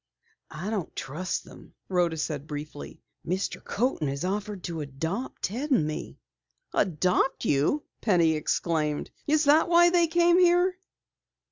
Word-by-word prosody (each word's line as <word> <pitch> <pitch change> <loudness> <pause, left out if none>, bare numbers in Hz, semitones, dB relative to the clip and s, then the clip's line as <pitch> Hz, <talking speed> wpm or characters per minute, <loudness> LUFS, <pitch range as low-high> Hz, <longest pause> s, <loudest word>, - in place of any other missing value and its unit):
"I 175 +7 -5
don't 200 -7 -3
trust 170 +7 -3
them," - - -15
Rhoda 175 -3 +1
said 150 -2 -3
briefly. 150 -1 -8 0.2
"Mr. 185 +3 -3
Coaten 225 - -1
has 140 +4 -3
offered 200 0 -3
to 165 -2 -4
adopt 160 - -4
Ted 250 +10 -2
and 250 - +3
me." 155 0 -5 0.6
"Adopt 185 - +1
you!" 150 - +2 0.2
Penny 175 -6 +3
exclaimed. 155 -1 -1 0.2
"Is 305 +1 +3
that 300 +4 +4
why 345 0 +6
they 345 -1 +4
came 345 +2 +4
here?" 355 +1 +4
185 Hz, 135 wpm, -27 LUFS, -, 0.6 s, why